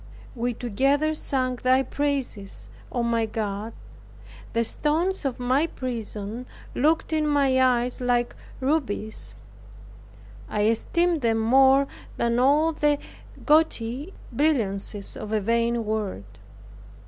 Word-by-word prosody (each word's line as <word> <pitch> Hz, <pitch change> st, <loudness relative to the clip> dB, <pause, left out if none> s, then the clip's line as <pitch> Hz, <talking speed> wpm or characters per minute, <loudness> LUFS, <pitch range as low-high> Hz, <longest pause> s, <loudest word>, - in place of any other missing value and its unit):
We 245 Hz, -1 st, -2 dB
together 275 Hz, +7 st, +1 dB
sang 255 Hz, -4 st, -1 dB
thy 255 Hz, +2 st, +3 dB
praises, 270 Hz, -9 st, -3 dB, 0.2 s
O, 240 Hz, -, -1 dB
my 230 Hz, -1 st, +1 dB
God! 215 Hz, 0 st, -3 dB, 0.8 s
The 230 Hz, -, +2 dB
stones 315 Hz, +9 st, 0 dB
of 260 Hz, -3 st, -2 dB
my 260 Hz, +6 st, +2 dB
prison 235 Hz, -3 st, -5 dB, 0.3 s
looked 315 Hz, +3 st, +1 dB
in 310 Hz, -1 st, +1 dB
my 275 Hz, -3 st, +3 dB
eyes 250 Hz, 0 st, +1 dB
like 245 Hz, -1 st, +1 dB, 0.3 s
rubies; 260 Hz, -7 st, -1 dB, 1.1 s
I 210 Hz, -, -1 dB
esteemed 335 Hz, +9 st, +1 dB
them 225 Hz, -2 st, +2 dB
more 265 Hz, +4 st, +5 dB, 0.3 s
than 235 Hz, 0 st, +1 dB
all 295 Hz, +5 st, +4 dB
the 295 Hz, -1 st, +2 dB, 0.5 s
gaudy 295 Hz, -1 st, +2 dB, 0.2 s
brilliancies 210 Hz, -8 st, 0 dB
of 210 Hz, -, -6 dB
a 215 Hz, -, +2 dB
vain 230 Hz, +2 st, +1 dB
world. 205 Hz, -, -4 dB
250 Hz, 110 wpm, -25 LUFS, 225-285 Hz, 1.1 s, more